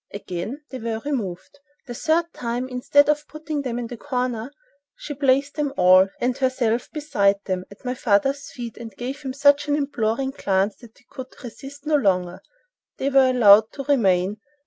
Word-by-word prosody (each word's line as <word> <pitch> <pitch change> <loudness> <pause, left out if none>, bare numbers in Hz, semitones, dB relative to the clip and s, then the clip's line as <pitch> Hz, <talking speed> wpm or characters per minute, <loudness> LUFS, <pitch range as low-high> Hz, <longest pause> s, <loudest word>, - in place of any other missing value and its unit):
Again 200 - -6
they 260 - -6
were 225 -1 -3
removed. 230 -3 -4 0.3
The 245 - -7
third 330 +6 0
time, 245 +1 -3
instead 260 +3 +3
of 300 0 0
putting 310 -1 -5
them 250 -3 -3
in 245 - -3
the 235 +1 -8
corner, 250 -2 -3 0.4
she 295 - -7
placed 275 0 +2
them 290 -2 -2
all, 185 +1 +6
and 245 0 0
herself 255 -3 0
beside 210 -11 +1
them, 185 -1 -2
at 200 +5 -16
my 250 - -1
father's 270 +5 +1
feet, 235 -3 -8
and 225 -4 -10
gave 265 +4 -5
him 265 -3 -4
such 285 +1 +4
an 290 - +2
imploring 270 -3 -1
glance 195 -5 0
that 235 -3 -17
he - - -25
could 260 -2 -7 0.2
resist 275 +4 -10
no 310 - -1
longer, 185 -6 0
and - - -32 0.6
they 270 - -1
were 265 -1 +5
allowed 220 -3 +6
to 275 - -6
remain. 200 -8 +2
250 Hz, 185 wpm, -23 LUFS, 215-280 Hz, 0.6 s, all